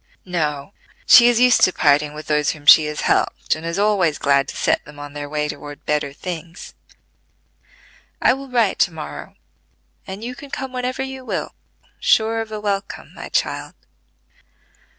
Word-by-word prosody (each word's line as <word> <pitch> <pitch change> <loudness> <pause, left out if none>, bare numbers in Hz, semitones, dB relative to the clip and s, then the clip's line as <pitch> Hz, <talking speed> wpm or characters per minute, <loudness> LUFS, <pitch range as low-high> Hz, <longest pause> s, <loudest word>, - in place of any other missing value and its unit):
"No: 155 -2 -3 0.3
she 240 -1 +8
is 240 -1 +2
used 250 -1 +5
to 185 - +5
parting 150 -2 +2
with 155 0 -8
those 150 -1 +1
whom 145 -2 -5
she 155 - +8
has 150 0 -4
helped, - - 0
and 155 - -7
is 170 +2 -3
always 200 -7 +2
glad 140 -1 +2
to - - -8
set - - +1
them 150 -1 -14
on 145 0 -9
their 145 -1 -6
way 150 0 -1
toward 145 -1 -9
better 150 -2 -1
things. 170 +2 -8 1.5
I - - +4
will 270 +1 -8
write 235 -5 +1
to 175 - +3
morrow, 160 -2 -8 0.7
and 195 +3 -7
you 245 +2 -5
can 280 +3 -12
come 265 -1 -6
whenever 255 +1 -3
you 265 -1 -7
will, - - -4 0.5
sure 225 +1 +2
of 220 -1 -7
a 215 - -4
welcome, 200 -1 -4
my - - -9
child." - - -2
175 Hz, 170 wpm, -20 LUFS, 150-225 Hz, 1.5 s, she